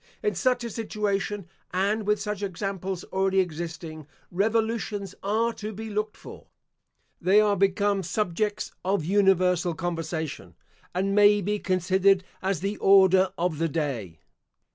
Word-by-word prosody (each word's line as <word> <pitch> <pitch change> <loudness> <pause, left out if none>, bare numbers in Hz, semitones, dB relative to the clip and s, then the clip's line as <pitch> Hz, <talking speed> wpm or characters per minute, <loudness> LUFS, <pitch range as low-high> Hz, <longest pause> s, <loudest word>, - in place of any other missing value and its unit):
In 420 - +1
such 250 -2 +1
a 235 - -4
situation, 205 -3 -2 0.2
and 200 +3 0
with 210 0 +2
such 210 -1 -4
examples 190 -1 -3
already 190 0 +2
existing, 160 -3 -4 0.2
revolutions 215 0 -1
are 225 +4 0
to 215 0 -6
be 220 +2 -7
looked 210 +1 -2
for. - - -12 0.7
They 190 +4 +5
are 210 -1 +3
become 200 +1 +2
subjects 210 +3 -2
of 190 -4 0
universal 180 -3 +3
conversation, 165 -2 -4 0.4
and 195 +2 0
may 205 0 +6
be 205 +2 -1
considered 190 +1 +2 0.2
as 190 -3 -1
the 200 +2 -2
Order 190 -1 +5
of 170 -3 -1
the 165 0 +1
day. 130 - -3
195 Hz, 135 wpm, -26 LUFS, 180-210 Hz, 0.7 s, may